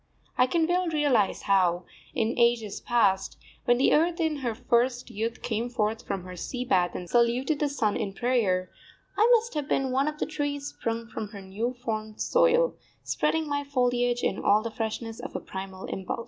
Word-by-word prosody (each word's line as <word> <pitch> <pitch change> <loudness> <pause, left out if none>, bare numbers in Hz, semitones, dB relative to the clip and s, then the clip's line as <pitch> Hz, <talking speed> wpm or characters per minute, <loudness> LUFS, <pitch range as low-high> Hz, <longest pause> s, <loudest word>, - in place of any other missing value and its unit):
I 255 - +4
can 325 +4 +2
well 355 +2 +1
realise 290 - +2
how, 180 -3 +2 0.3
in 225 +1 +1
ages 235 -4 +2
past, 200 -5 +1 0.3
when 245 -1 +4
the 260 - +4
earth 335 +3 +2
in 320 -2 +1
her 240 -5 -2
first 245 +2 +1
youth 225 +3 -3
came 230 +1 -1
forth 220 -2 -1
from 190 - -3
her 180 0 -8
sea 250 +8 -4
bath 180 -6 +2
and 180 - -5
saluted 240 - +2
the 295 - +1
sun 220 -7 0
in 195 - -2
prayer, 205 -8 +1 0.4
I 440 +3 +4
must 460 0 -1
have 295 -2 -3
been 265 -1 +1
one 270 +3 +2
of 300 0 -2
the - - -1
trees 290 -2 -3
sprung 230 0 -3
from 220 -2 -5
her 205 -1 -10
new 220 +7 -3
formed 215 -1 -3
soil, - - +3 0.3
spreading 320 -1 0
my 285 0 -1
foliage 245 -3 +1
in 195 - 0
all 210 +1 +3
the 230 - -4
freshness 225 0 -4
of - - -8
a - - -1
primal 190 0 -7
impulse. 190 +4 -4
240 Hz, 190 wpm, -27 LUFS, 215-285 Hz, 0.4 s, I